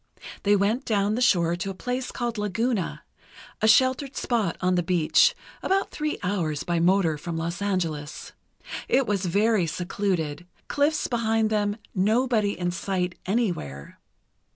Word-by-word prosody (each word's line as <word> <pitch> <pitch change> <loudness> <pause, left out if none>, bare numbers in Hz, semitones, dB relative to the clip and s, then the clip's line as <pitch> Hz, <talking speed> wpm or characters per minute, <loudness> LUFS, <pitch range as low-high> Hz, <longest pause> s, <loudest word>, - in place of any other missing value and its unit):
They 205 0 +4
went 210 +6 +1
down 205 -3 +1
the 240 - -1
shore 175 -8 +3
to 190 +3 -4
a 195 - -5
place 250 +4 -3
called 235 -3 -3
Laguna, 210 0 -1 0.6
a 220 - +3
sheltered 260 +4 +3
spot 220 -8 0
on 185 0 +1
the 180 - +2
beach, 180 - +3 0.3
about 390 +1 0
three 305 0 -2
hours 170 -6 -1
by 170 -1 0
motor 170 -3 +3
from 165 +1 -4
Los 170 +3 -3
Angeles. 165 -7 -2 0.6
It 265 +1 +3
was 200 -3 -1
very 205 0 +2
secluded—cliffs 180 - -2
behind 225 -2 +1
them; 205 -1 0 0.2
nobody 215 +1 +2
in 175 0 -1
sight 180 0 -2
anywhere. 175 - -2
200 Hz, 140 wpm, -25 LUFS, 175-230 Hz, 0.6 s, They